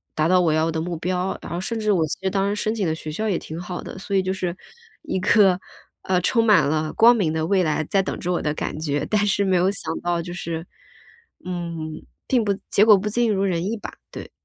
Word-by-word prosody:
达 155 0 +2
到 185 +1 +4
我 165 -3 +2
要 160 +1 +2
的 160 - -2
目 170 +2 -3
标， 180 +3 -1
然 - - -9
后 170 - -2
甚 225 +4 -3
至 215 -1 +1
我 170 -5 +2
觉 - - -4
得 190 - 0
当 195 +1 0
时 205 +1 -1
申 215 - 0
请 200 -6 -1
的 160 - 0
学 155 -1 -7
校 215 +8 -2
也 185 -5 0
挺 160 +2 -7
好 175 0 -5
的， - - -9
所 195 0 -3
以 190 - +4
就 185 - -1
是 185 -2 -3 0.5
一 300 - -2
颗， 190 -2 +4 0.4
呃， 180 -1 +1
充 230 +5 +2
满 205 -7 +6
了 155 0 -1
光 235 +2 +6
明 165 -8 0
的 160 0 -1
未 190 0 +3
来 155 -1 0
在 195 +6 +1
等 - - -4
着 180 - -2
我 - - 0
的 150 -1 -1
感 150 - -4
觉。 145 -2 -1
但 210 -1 +2
是 200 0 +2
没 190 -2 +2
有 185 +3 +3
想 165 -4 -4
到 175 -1 0
就 175 +1 -7
是。 165 -1 -5 0.8
嗯， 170 -3 -5 0.2
并 245 -4 +2
不 205 - +1 0.2
结 205 - +4
果 215 -2 +8
不 200 +2 -3
尽 230 +1 +1
如 195 0 0
人 175 -3 0
意 225 +3 -2
吧， - - -8 0.2
对。 - - -8
180 Hz, 280 characters per minute, -23 LUFS, 165-200 Hz, 0.8 s, 果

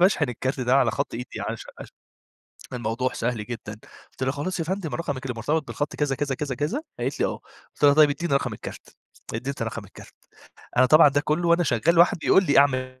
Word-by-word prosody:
باشحن 175 -6 +3
الكارت 130 +3 -3
ده 125 +1 +2
على 130 -4 +4
خط 110 - -3
إيدي 125 +3 -6
عش - - -4 0.2
عش - - -9 0.9
الموضوع 120 +1 -2
سهل 115 -2 -2
جدًا، 115 -3 -7 0.4
قُلت - - -19
لها: 130 - +1
"خلاص 160 +6 -4
يا - - 0
فندم 185 -3 -3
رقمِك 145 -6 -4
اللي 125 - -2
مرتبط 150 +4 -1
بالخط 145 0 -3
كذا 145 -2 0
كذا 140 -1 -2
كذا 140 -1 -4
كذا؟" 155 - -2 0.2
قالت - - -3
لي: - - +3
"آه." - - -4 0.3
قُلت - - -9
لها: 145 -1 +7
"طيب 150 -1 +6
اديني 150 +2 -2
رقم 140 - 0
الكارت." - - -10 0.4
اديتني 115 0 -3
رقم 115 -2 -6
الكارت. 100 - -15 0.6
أنا 130 +1 +6
طبعًا 155 +3 +7
ده 145 +1 +1
كله 155 +3 0
وأنا 170 +1 +4
شغال 160 +5 +2
واحد 170 0 +5
بيقول 190 +5 +4
لي 145 - +3
أعمل 130 -2 +2
140 Hz, 210 wpm, -24 LUFS, 125-155 Hz, 0.9 s, لها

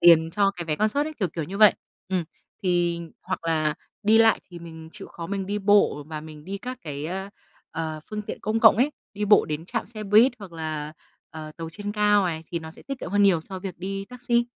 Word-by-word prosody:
tiền 165 -1 +7
cho 200 +2 +3
cái 180 -3 -6
vé 155 -2 -1
concert 215 - +2
ấy, 310 - -4
kiểu, 185 - +2
kiểu 160 -3 -4
như 195 +6 -6
vậy. 215 -3 +8 0.3
Ừm. 185 -3 0 0.4
Thì 175 -2 +1 0.2
hoặc 185 -2 -4
là 155 -2 +1 0.3
đi 220 +2 +5
lại 225 -1 +5
thì 175 - -8
mình 160 -1 -10
chịu 205 -2 -7
khó 170 - -7
mình 195 0 -3
đi 205 +1 -1
bộ 200 -7 +3
và 155 -1 -5
mình 155 -1 -11
đi 195 +1 -5
các 250 +2 -6
cái, 145 -1 -5
a, 190 +3 -4 0.4
ờ, 160 -1 -4
phương 210 0 -3
tiện - - -6
công 220 +1 0
cộng 225 - +8
ấy, 265 +6 +3 0.2
đi 210 +1 -1
bộ 205 +1 +6
đến 155 +1 -4
trạm - - -2
xe 215 0 -7
buýt, 220 +6 +6
hoặc 195 -5 -10
là, 155 -2 -4 0.4
ờ, 155 -1 -8
tàu 165 -1 -6
trên 205 +3 -5
cao 210 -1 +4
này 160 -2 -3
thì 170 - -2
nó 160 0 -8
sẽ - - -12
tiết 275 -2 -5
kiệm - - -5
hơn 205 0 +3
nhiều 185 -5 +5
so 190 +3 -7
với 190 -1 -5
việc - - -34
đi 195 +2 -4
taxi. 240 0 +1
190 Hz, 245 wpm, -25 LUFS, 160-210 Hz, 0.4 s, vậy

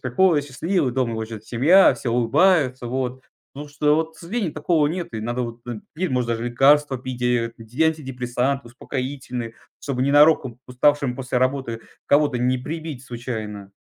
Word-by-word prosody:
приходит 145 +4 +2
счастливый. 145 +1 -1
Дома 125 -2 0
его 110 0 -3
ждет 110 -1 -9
семья, 155 +11 +5
все 120 - -4
улыбаются, 130 +2 +2
вот. 130 +1 -3 0.3
Ну 145 +1 -7
что 150 0 +2
вот, 160 +1 -1
к - - -18
сожалению, 180 -1 -3
такого 155 0 +1
нет. 170 -5 -5
И 110 - -3
надо, 120 +3 -2
вот, 115 0 -6
н 120 -3 -6
пить 180 +3 -2
может 125 -2 0
даже 115 0 -2
лекарства 135 +2 +3
пить, 125 0 -6
э, 120 -1 +1
ди 115 +7 -3
антидепрессанты, 135 -3 -1
успокоительные, 125 -2 -5 0.3
чтобы 130 -3 -2
ненароком 140 -3 +4
уставшим 135 +1 +2
после 125 -1 -2
работы 130 -3 -1 0.3
кого-то 145 -2 +3
не 125 +1 +1
прибить 155 -1 -6
случайно. 110 -5 -6
130 Hz, 165 wpm, -22 LUFS, 120-150 Hz, 0.3 s, семья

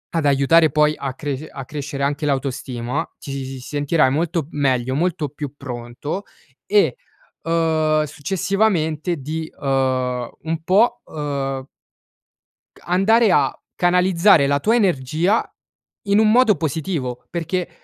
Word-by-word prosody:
ad 165 -3 +1
aiutare 145 +3 +4
poi 150 +1 +3
a 135 -2 -4
cresc 145 +1 -4
a 135 - -7
crescere 145 0 -5
anche 145 +2 -1
l'autostima, 135 0 -2
ti 135 -2 -6
s 125 - -11
sentirai 145 0 +2
molto 165 0 -1
meglio, 130 -4 0
molto 160 -2 -1
più 145 0 -7
pronto, 125 +7 -6 0.4
e, 420 +2 +3 0.5
uhm, 160 -2 +2
successivamente 175 0 0
di 155 +3 -5
uhm, 130 -3 0
un 160 0 -3
po', 225 +7 +3
uhm 140 -3 -4 1.1
Ca - - -20
andare 205 +5 +4
a - - +3 0.2
canalizzare 180 -2 +4
la 140 0 +2
tua 220 +10 +2
energia, 175 - +1 0.6
in 200 +1 +3
un 215 -1 +5
modo 230 -5 +5
positivo, 145 -4 -3
perché 175 +1 -2
150 Hz, 125 wpm, -21 LUFS, 135-175 Hz, 1.1 s, un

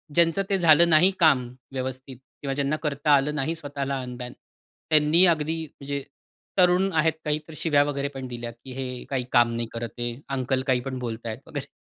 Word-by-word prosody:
ज्यांचं 170 +2 +3
ते 195 - +2
झालं 170 -1 +6
नाही 165 +3 +6
काम 155 -7 +5 0.3
व्यवस्थित 130 0 -5 0.2
किंवा 140 -1 -2
ज्यांना 140 +2 0
करता 145 0 0
आलं 145 +2 +1
नाही 155 +3 -1
स्वतःला 140 -3 -3
अनबॅन. 125 -1 -7 0.6
त्यांनी 155 +3 +5
अगदी 160 -2 +1
म्हणजे 140 -1 -6 0.5
तरुण 180 +1 +4
आहेत, 160 0 +3
काही 150 0 0
तर 160 - -10
शिव्या 145 -3 +3
वगैरे 140 -1 -2
पण 135 -1 -6
दिल्या 120 -1 -6
की 120 +3 -13
हे 125 -1 -5
काही 130 -3 -1
काम 120 -1 +4
नाही 115 0 -2
करते, 120 +1 -4 0.2
अंकल 130 -1 0
काही 130 -2 +3
पण 130 - -3
बोलतायत 115 -1 -5
वगैरे. 145 -2 -5
140 Hz, 180 wpm, -25 LUFS, 125-155 Hz, 0.6 s, झालं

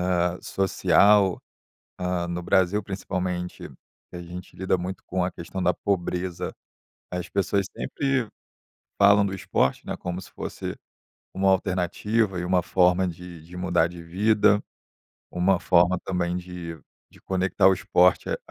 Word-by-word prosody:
eh, 90 +1 0
social, 95 +1 +3 0.6
ah, 90 -1 -1
no 85 0 -3
Brasil 95 +3 +2
principalmente, 90 -2 -4 0.4
que - - -12
a - - -7
gente 90 +1 -10
lida 95 +1 0
muito 90 +2 -5
com 90 0 -1
a 90 - -1
questão 85 +3 -6
da 90 +1 +3
pobreza, 90 -1 -2 0.6
as 90 -1 -4
pessoas 100 0 0
sempre 135 -4 -1 0.7
falam 100 0 +6
do 95 - -3
esporte, 65 -7 0
né, - - -3
como 90 0 -4
se - - -13
fosse - - -6 0.6
uma 95 0 +2
alternativa 95 +2 0
e - - -3
uma 90 0 +2
forma 90 +1 +3
de 85 -1 -8
de 85 +2 -13
mudar 90 -2 +2
de 85 0 -10
vida, 105 +4 +3 0.7
uma 90 +1 +2
forma 90 0 +4
também 90 -2 -1
de 90 -2 -7 0.3
de - - -20
conectar 95 0 +2
o 95 - +6
esporte 90 0 +3
à - - 0
90 Hz, 145 wpm, -25 LUFS, 90-95 Hz, 0.7 s, falam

